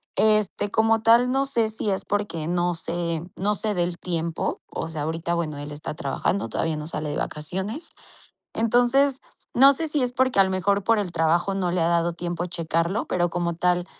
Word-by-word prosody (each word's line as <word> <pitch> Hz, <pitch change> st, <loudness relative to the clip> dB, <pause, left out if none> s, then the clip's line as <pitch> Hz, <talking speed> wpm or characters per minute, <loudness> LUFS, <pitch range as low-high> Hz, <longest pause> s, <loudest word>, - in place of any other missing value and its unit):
Este, 215 Hz, -1 st, +2 dB
como 225 Hz, +1 st, +3 dB
tal, 235 Hz, +2 st, +5 dB
no 270 Hz, +1 st, +2 dB
sé 235 Hz, -5 st, +1 dB
si 215 Hz, -1 st, -2 dB
es 190 Hz, -, -2 dB
porque 205 Hz, -6 st, -2 dB
no 175 Hz, 0 st, +1 dB
sé 170 Hz, 0 st, -2 dB
no 205 Hz, +3 st, 0 dB
sé 215 Hz, +1 st, -1 dB
del 175 Hz, -1 st, -1 dB
tiempo. 170 Hz, -2 st, -2 dB
O -, -, -5 dB
sea, 160 Hz, -2 st, -5 dB
ahorita, 165 Hz, +2 st, -2 dB
bueno, 160 Hz, -4 st, -2 dB
él 145 Hz, +1 st, -7 dB
está 150 Hz, +1 st, -6 dB
trabajando, 155 Hz, +7 st, -1 dB
todavía 160 Hz, -1 st, -1 dB
no 150 Hz, +1 st, -6 dB
sale 155 Hz, -2 st, -4 dB
de 145 Hz, -, -3 dB
vacaciones. 190 Hz, -, -4 dB, 0.6 s
Entonces, 245 Hz, +4 st, +3 dB, 0.3 s
no 275 Hz, +3 st, +8 dB
sé 320 Hz, +3 st, -2 dB
si 295 Hz, -2 st, +1 dB
es 250 Hz, 0 st, 0 dB
porque, 255 Hz, -2 st, +1 dB
a 195 Hz, -, +8 dB
lo 190 Hz, -, -2 dB
mejor, 195 Hz, +1 st, +1 dB
por 225 Hz, +1 st, +3 dB
el 185 Hz, -4 st, -2 dB
trabajo 170 Hz, +4 st, +1 dB
no 185 Hz, -2 st, 0 dB
le 180 Hz, -, 0 dB
ha 165 Hz, -, +2 dB
dado 170 Hz, 0 st, +1 dB
tiempo 175 Hz, 0 st, -4 dB
de 180 Hz, -, -7 dB
checarlo. 170 Hz, +3 st, -1 dB
Pero, 175 Hz, -1 st, 0 dB
como 170 Hz, -1 st, -1 dB
tal, 180 Hz, 0 st, +1 dB
180 Hz, 205 wpm, -24 LUFS, 170-220 Hz, 0.6 s, no